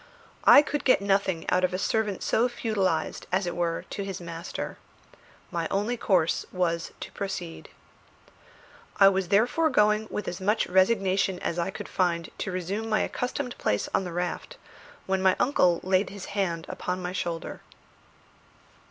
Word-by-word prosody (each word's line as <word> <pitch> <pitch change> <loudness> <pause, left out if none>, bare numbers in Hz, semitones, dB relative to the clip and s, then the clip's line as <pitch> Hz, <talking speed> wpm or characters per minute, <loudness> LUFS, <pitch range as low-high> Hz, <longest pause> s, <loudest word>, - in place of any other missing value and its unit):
I 290 - +9
could 295 -1 -3
get 255 - +5
nothing 195 -3 0
out 180 0 +3
of 185 0 +1
a - - 0
servant 210 0 -1
so 240 +3 +2
feudalised, 205 -8 -1
as 190 +1 +1
it 175 - -3
were, 170 -1 -1
to 200 - -3
his 195 -2 -5
master. 170 0 -6 0.7
My 170 -2 -1
only 210 +5 0
course 180 -8 +1
was 170 -2 -1
to - - -6
proceed. 190 -4 -5 1.3
I 195 -1 +9
was 190 -1 -1
therefore 245 - +3
going 215 -3 +3
with 210 - -4
as 180 +2 -4
much 210 +4 +2
resignation 190 0 +2
as 175 -1 -3
I 170 +2 0
could - - -7
find 170 -3 0
to 190 - -3
resume 190 +5 -3
my 215 - +2
accustomed 250 0 -3
place 105 - 0
on - - +2
the 180 - -5
raft, 180 - -4 0.5
when 190 0 0
my 190 -1 +4
uncle 180 -10 +3
laid 185 +2 +2
his 200 -1 -8
hand 175 -5 -1
upon 180 0 -3
my 180 -1 -4
shoulder. 170 -3 -4
190 Hz, 160 wpm, -27 LUFS, 175-210 Hz, 1.3 s, I